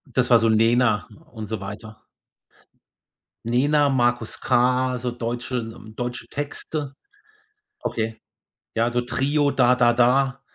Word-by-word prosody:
Das 125 -1 +2
war 120 -2 +7
so 115 0 +2
Nena 115 0 +3 0.2
und 110 -3 -7
so 110 -2 -4
weiter. 105 +2 -9 1.4
Nena, 145 +5 +2
Markus 120 -3 +1
K, 125 +1 +2
so 125 0 -2
deutsche 120 +1 -4
n 115 -1 -5
ähm, 110 0 -13
deutsche 120 -1 -4
Texte. 145 0 -5 0.9
Okay. 110 -1 -3 0.6
Ja, 115 +1 +1
also 120 +1 0
Trio, 140 +4 0
Da 125 -1 +4
Da 120 -1 +4
Da, 135 +3 +2
120 Hz, 130 wpm, -23 LUFS, 115-130 Hz, 1.4 s, war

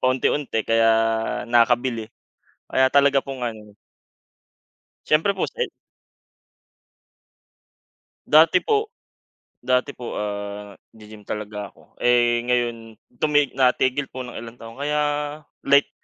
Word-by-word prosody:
paunti-unti. 130 -1 +1
Kaya, 115 0 +4 0.6
nakakabili, 120 -1 +2 0.5
kaya 130 0 +2
talaga 140 0 +4
pong 135 -3 -5
ano 105 -3 -8 1.3
Siyempre 160 +6 +2
po 190 - -1
sa - - -7 2.7
Dati - - +5
po 435 -1 +1 0.8
dati 125 +2 +2
po, 120 - -6
ah, 100 -1 -5 0.2
g-gym 105 -1 -14
talaga 105 -1 -5
ako. - - -24
Eh, 120 -1 +3
ngayon 120 -2 -1 0.2
tumig 145 -3 +2
natigil 130 +1 +2
po 130 - -7
ng 125 - -9
ilang 115 0 -9
taon, 115 0 -12
kaya 150 +1 0 0.7
light, 140 +1 +4
120 Hz, 105 wpm, -22 LUFS, 110-135 Hz, 2.7 s, Dati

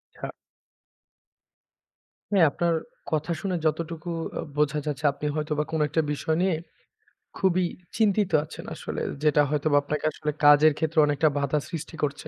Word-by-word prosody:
আচ্ছা। - - -6 2.0
হ্যাঁ, 185 -5 +6
আপনার 170 +2 0 0.4
কথা 155 +2 0
শুনে 190 -2 -1
যতটুকু 165 +2 -2 0.3
অ - - -1 0.2
বোঝা 150 0 +2
যাচ্ছে 150 0 -3
আপনি 140 +1 -7
হয়তোবা 150 -1 -1
কোনো 160 -1 +1
একটা 160 +3 +2
বিষয় 155 +2 -1
নিয়ে 185 -2 +2 0.8
খুবই 185 -1 +2 0.3
চিন্তিত 210 -3 +2
আছেন 155 - -10
আসলে। - - -5 0.2
যেটা 150 -1 +4
হয়তোবা 150 0 +2
আপনাকে 150 +2 -3
আসলে 150 0 -3
কাজের 145 +1 +7
ক্ষেত্রে 160 0 0
অনেকটা 145 +1 +2
বাঁধা 140 +1 +1
সৃষ্টি 165 -1 -6
করছে। 145 -1 -2
155 Hz, 140 wpm, -26 LUFS, 150-170 Hz, 2.0 s, কাজের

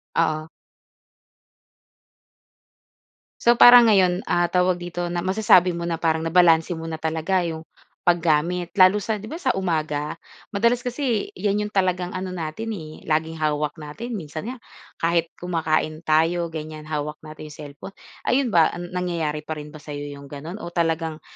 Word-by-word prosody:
Oo. 155 -1 0 2.9
So, 235 0 +5
parang 245 -1 +9
ngayon, 185 -4 +4
ah, 175 0 +1
tawag 180 0 +3
dito, 175 0 -4
na 175 0 -3
masasabi 185 -2 +4
mo 170 0 -4
na 170 - -1
parang 160 0 0
nabalanse 165 0 +4
mo 160 - -7
na 160 - -5
talaga 160 +4 0
yung 160 -1 -5 0.5
paggamit 170 +1 +1
lalo 185 0 +6
sa 220 +2 -2
'di 215 - -9
ba 325 - -4
sa 260 -7 +1
umaga? 155 -4 -2 0.3
Madalas 235 +4 +2
kasi 250 - -1
yan 205 0 0
yung 210 - -4
talagang 185 -3 0
ano 185 0 -4
natin 175 +7 -4
eh, 155 -4 -9
laging 160 +1 -1
hawak 150 0 -1
natin. 220 +11 -6
Minsan 155 +5 -6
nga 260 - -6 0.4
kahit 165 0 +1
kumakain 160 -2 -1
tayo, 165 +2 +2
ganyan, 155 -1 -7
hawak 150 0 -4
natin 155 0 -10
yung 150 - -11
cellphone. 145 +6 -10 0.3
Ayun 260 -1 +2
ba, 165 -4 +4
nangyayari 175 -4 -3
pa 160 - -3
rin 150 0 -8
ba 155 - -10
sa 150 0 -9
iyo 145 0 -6
yung 140 - -11
ganoon? 150 +7 -8
O 170 -3 -8
talagang 165 -2 -1
170 Hz, 160 wpm, -23 LUFS, 155-185 Hz, 2.9 s, parang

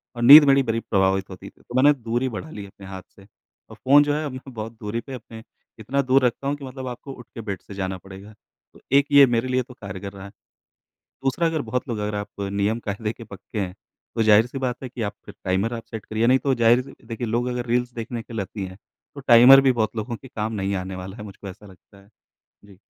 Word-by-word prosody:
और 120 - -5
नींद 145 +6 +11
मेरी 135 0 +5
बड़ी 115 -2 -1
प्रभावित 95 -2 0
होती 95 -1 -10
थी। - - -26
तो 120 - -11
मैंने 140 +3 +6
दूरी 120 0 -2
बढ़ा 125 +7 -7
ली 105 -9 -8
अपने 100 0 -14
हाथ 95 -1 -7
से, 100 - -17 0.4
और - - -11
फ़ोन 145 +3 +5
जो 145 0 0
है 155 +1 -2
अब 145 - -4
मैं 130 0 -9
बहुत 110 0 -6
दूरी 110 +2 -3
पे 135 - -10
अपने 115 -2 -10 0.4
इतना 130 +6 -1
दूर 130 0 +3
रखता 125 +3 -1
हूँ 140 - 0
कि 145 -1 -9
मतलब 130 0 -7
आपको 125 +2 -7
उठ 125 - -12
के 115 - -5
बेड 100 -4 -5
से - - -12
जाना 95 -1 -3
पड़ेगा। 95 +3 -12 0.4
तो - - -18 0.2
एक 140 - +4
ये 140 -1 +9
मेरे 120 0 0
लिए 130 0 +1
तो 125 - -14
कारगर 100 -3 -8
रहा 95 -1 -10
है। 100 - -11 0.9
दूसरा, 135 +6 +1
अगर 160 -2 -1
बहुत 125 +3 -3
लोग 115 - -2
अगर 105 0 -3
आप 105 0 -4
नियम-कायदे 100 +2 -2
के 115 - -11
पक्के 105 +1 -8
हैं, 90 -2 -3 0.4
तो 115 - +2
ज़ाहिर-सी 110 +4 +4
बात 130 -2 -1
है 130 - -5
कि 125 -1 -8
आप 105 -2 -2
फिर - - -11
टाइमर 95 +5 0
आप 115 -1 -5
सेट 110 -2 -7
करिए, 110 +2 0
नहीं 130 +1 +5
तो 135 0 +1
ज़ाहिर-सी 120 +3 +3
देखिए 115 0 -4
लोग 120 +3 0
अगर 125 -1 -3
रील्स 125 +1 0
देखने 115 0 -5
के 115 - -13
लती 100 -1 -4
हैं, 95 0 -10 0.4
तो 140 - -8
टाइमर 125 +3 +9
भी - - +6
बहुत 115 -2 -1
लोगों 115 +2 -3
के 130 - -13
काम 110 -2 -4
नहीं 100 -1 -2
आने 95 0 -4
वाला 95 +3 -8
है, 105 - -8
मुझको 100 -1 -10
ऐसा 100 +3 -13
लगता 100 +1 -18
है। 100 - -23 0.6
जी। 100 -2 -18
115 Hz, 250 wpm, -23 LUFS, 100-130 Hz, 0.9 s, नींद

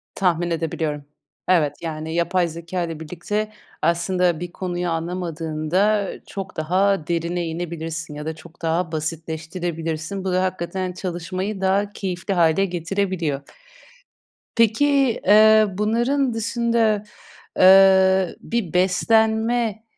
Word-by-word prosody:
Tahmin 175 -2 +1
edebiliyorum. 155 -3 -2 0.4
Evet, 155 -6 +3
yani 160 -1 -5
yapay 175 +1 +1
zekâyla 170 0 -4
birlikte 195 +7 -3 0.3
aslında 170 +1 +1
bir 175 0 -6
konuyu 175 -1 -3
anlamadığında 170 +3 -1 0.2
çok 195 -1 -7
daha 185 +1 +1
derine 170 +1 -1
inebilirsin 165 -1 -5
ya 150 0 -6
da 160 0 -3
çok 160 +1 -16
daha 165 +1 0
basitleştirebilirsin. 160 +2 -4
Bu 190 - -1
da 185 +1 +2
hakikaten 185 0 -3
çalışmayı 185 +3 -4
daha 195 +2 +1
keyifli 190 0 -3
hâle 170 +1 +3
getirebiliyor. 175 -4 -2 1.1
Peki, 260 +3 +3
ııı, 215 -1 +6
bunların 240 +5 +1
dışında, 230 -2 +1 0.6
ııı, 190 -1 +6
bir 225 -8 -3
beslenme, 220 +4 +2
180 Hz, 105 wpm, -22 LUFS, 165-200 Hz, 1.1 s, ııı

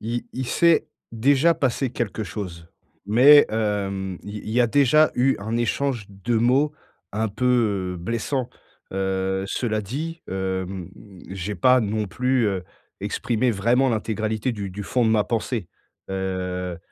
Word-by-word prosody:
Il 120 +2 -3
il 130 -1 -4
s'est 170 +3 +3 0.3
déjà 140 +8 +3
passé 135 -4 0
quelque 110 -3 -3
chose. 85 -6 -7 0.4
Mais 135 +7 +7
hem, 100 -4 -2
il 105 +1 -7
il - - -4
y 120 +3 +2
a 120 - +5
déjà 145 +4 +4
eu 130 +2 +2
un 110 +3 -2
échange 120 -2 -1
de 100 +4 -2
mots 130 +6 +3 0.4
un 110 +1 0
peu, 105 -5 +1
heu, - - -6
blessant. 115 +7 -2 0.4
Heu, 95 0 -1
cela 110 0 -1
dit, 155 - -5
hem, 95 -1 -3 0.4
j'ai 95 +2 -4
pas 125 +8 +4
non 105 0 -1
plus, 125 +4 +1
heu, 95 -3 -2 0.4
exprimé 120 +1 0
vraiment 120 +6 +2
l'intégralité 110 +1 -1
du 100 -3 -5
du 100 +2 -6
fond 120 +4 0
de 110 - +3
ma 105 -2 +3
pensée. 115 -4 -2 0.4
Heu, 90 -2 -3
110 Hz, 150 wpm, -23 LUFS, 95-125 Hz, 0.4 s, Mais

